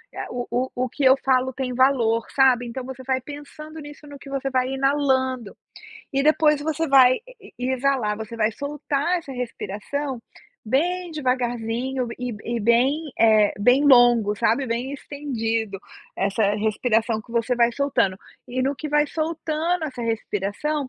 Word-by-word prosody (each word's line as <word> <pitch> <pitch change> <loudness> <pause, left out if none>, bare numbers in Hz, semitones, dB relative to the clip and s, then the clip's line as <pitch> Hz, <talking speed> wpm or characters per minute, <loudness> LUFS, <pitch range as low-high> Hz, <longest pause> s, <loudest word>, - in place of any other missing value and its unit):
ah, - - -5
o 245 0 -4
o 250 +2 -1
o 255 0 -1
que 285 - -4
eu 260 0 +7
falo 260 0 +2
tem 255 -1 -3
valor", 240 -3 +2
sabe, 260 -3 +4
então 245 +2 -6
você 260 0 -8
vai 260 0 -1
pensando 300 +3 -10
nisso 295 0 -11
no 285 0 -10
que 275 - -12
você 275 0 -2
vai 255 -1 0
inalando, 265 -4 0 0.6
e 275 0 +1
depois 305 0 +3
você 315 +2 -1
vai 260 -2 +6 0.2
e 400 - -15
e 250 +1 -2
exalar, 260 -5 0
você 220 +1 -7
vai 220 -1 +2
soltar 290 +5 -2
essa 295 -5 -9
respiração 250 +2 -4 0.4
bem 345 +10 0
devagarzinho 250 -2 -2
e 250 -1 -3
b 205 - -12
e 235 0 -2
bem, 260 +8 +2
eh, 215 -2 +4
bem 245 +7 +4
longo, 240 -5 +5
sabe, 235 +6 +1
bem 240 +3 -3
estendido, 230 -8 -3 0.3
essa 200 +1 +1
respiração 220 +1 0
que 230 - -15
você 235 +1 0
vai 235 0 +3
soltando. 240 -8 +1 0.3
E 255 +1 -3
no 275 +2 0
que 310 - -5
vai 295 0 +2
soltando 320 +2 -2
essa 255 -4 -6
respiração, 230 +6 -2
260 Hz, 165 wpm, -23 LUFS, 230-285 Hz, 0.6 s, eu